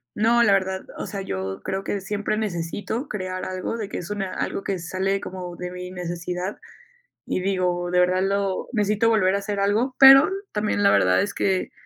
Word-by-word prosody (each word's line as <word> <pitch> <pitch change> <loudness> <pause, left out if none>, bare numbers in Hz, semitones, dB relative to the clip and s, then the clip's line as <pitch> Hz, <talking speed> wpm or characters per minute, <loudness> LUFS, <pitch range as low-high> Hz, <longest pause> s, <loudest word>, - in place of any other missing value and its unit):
no, 235 +3 +4
la 205 -4 +5
verdad, 190 -1 0
o - - -5
sea, 200 -1 -5
yo 95 - -4
creo 195 +1 -3
que, 200 - -2
siempre 205 +2 -2
necesito 205 - -3
crear 185 -2 -4
algo 185 +4 -3
de 210 -3 -5
que, - - -5
es 180 +4 -6
una 195 -3 -3
algo 195 - -3
que 195 - -2
sale 190 +3 -1
como 180 -2 -7
de 180 0 -5
mi 180 0 -7
necesidad, 180 +1 -4 0.7
y - - -2
digo, 180 -2 0
de 180 - +3
verdad, 185 +1 +3
lo 195 -1 -1
necesito 210 +1 +2
volver 195 -4 +3
a - - 0
hacer 200 0 -3
algo, 220 +6 +1
pero 270 +2 +10
n 380 - -3 0.2
también 210 -1 0
la 200 - +6
verdad - - +4
es 205 - -4
que, 190 -1 0
195 Hz, 205 wpm, -24 LUFS, 180-210 Hz, 0.7 s, pero